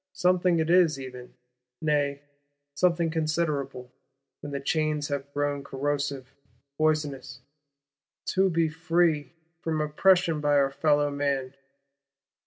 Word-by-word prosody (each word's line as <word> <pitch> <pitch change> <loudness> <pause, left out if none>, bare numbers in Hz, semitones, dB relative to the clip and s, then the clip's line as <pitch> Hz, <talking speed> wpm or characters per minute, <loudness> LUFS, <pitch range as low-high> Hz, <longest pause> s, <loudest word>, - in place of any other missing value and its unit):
Something 180 -1 +2
it 160 +1 +1
is 170 -6 +4
even,—nay, 125 +3 -4 0.5
something 170 +1 +1
considerable, 150 -5 -2 0.5
when 145 - -8
the 140 - -3
chains 150 +1 -1
have 140 0 -4
grown 145 -1 -1
corrosive, 140 -1 -3 0.4
poisonous, 150 -3 -1 0.8
to 190 0 +2
be 165 -2 +2
free 165 -1 0 0.3
"from 160 -2 -2
oppression 165 +1 +3
by 145 -1 +3
our 135 -1 +3
fellow 145 +1 +2
man." 140 -2 -1
145 Hz, 105 wpm, -27 LUFS, 140-165 Hz, 0.8 s, is